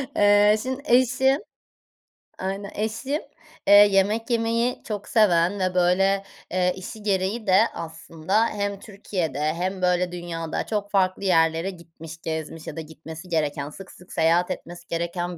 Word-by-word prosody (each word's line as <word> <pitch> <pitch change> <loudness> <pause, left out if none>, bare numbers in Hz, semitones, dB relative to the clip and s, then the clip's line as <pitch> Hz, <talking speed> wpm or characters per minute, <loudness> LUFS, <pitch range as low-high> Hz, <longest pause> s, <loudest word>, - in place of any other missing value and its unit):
Eee, 205 +1 +5
şimdi 260 +2 -4
eşim 260 +2 +3 1.0
aynen 195 +2 -4
eşim, 230 +8 -2 0.5
eee, 200 - +7
yemek 205 +3 +5
yemeyi 230 +1 0
çok 210 -2 -5
seven 190 -3 +3
ve 185 -1 0
böyle, 195 +2 +3 0.3
eee, 180 0 +1
işi 200 +3 -9
gereği 200 +2 -1
de 185 0 +5 0.2
aslında 165 +6 -1
hem 200 -2 -3
Türkiye'de 190 - -4
hem 185 +2 -3
böyle 180 0 +1
dünyada 170 -2 -4
çok 205 -2 -3
farklı 190 0 +1
yerlere 165 -1 +2
gitmiş, 165 -2 -11
gezmiş 160 0 -5
ya - - -6
da 165 - -4
gitmesi 160 +2 -10
gereken 150 -3 -1
sık 190 +5 -11
sık 180 - -15
seyahat 170 +2 +2
etmesi 175 +1 -8
gereken 170 +1 -3
185 Hz, 140 wpm, -24 LUFS, 170-205 Hz, 1.0 s, eee